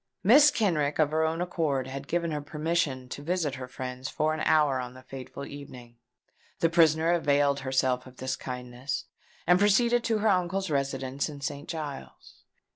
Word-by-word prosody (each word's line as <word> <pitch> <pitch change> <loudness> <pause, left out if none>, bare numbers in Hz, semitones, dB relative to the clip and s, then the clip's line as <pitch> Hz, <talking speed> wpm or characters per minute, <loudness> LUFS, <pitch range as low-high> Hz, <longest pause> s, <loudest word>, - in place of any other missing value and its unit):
Mrs. 290 +8 +8
Kenrick 155 - +1
of 155 -2 +2
her 160 +1 +1
own 160 +2 0
accord 155 -7 -1
had 135 +1 -7
given 170 -1 -1
her 150 -1 -2
permission 150 -3 -1
to 145 - -6
visit 165 -2 -1
her 130 -2 -6
friends 130 0 -6
for 155 +1 0
an 155 - -4
hour 150 -4 +3
on 125 0 -6
the 130 - -13
fatal 135 +1 -8
evening. 125 -5 -10 0.6
The 165 - +2
prisoner 160 -1 +4
availed 145 -4 +2
herself 130 -1 0
of 130 0 -15
this 130 0 -2
kindness, 125 +2 -5 0.4
and 180 +2 +5
proceeded 235 +4 +3
to 225 -1 +2
her 215 +1 +1
uncle's 185 -1 0
residence 135 0 -1
in 145 -2 -9
St. 140 +2 -5
Giles's. 145 - -8
145 Hz, 175 wpm, -28 LUFS, 130-170 Hz, 0.6 s, Mrs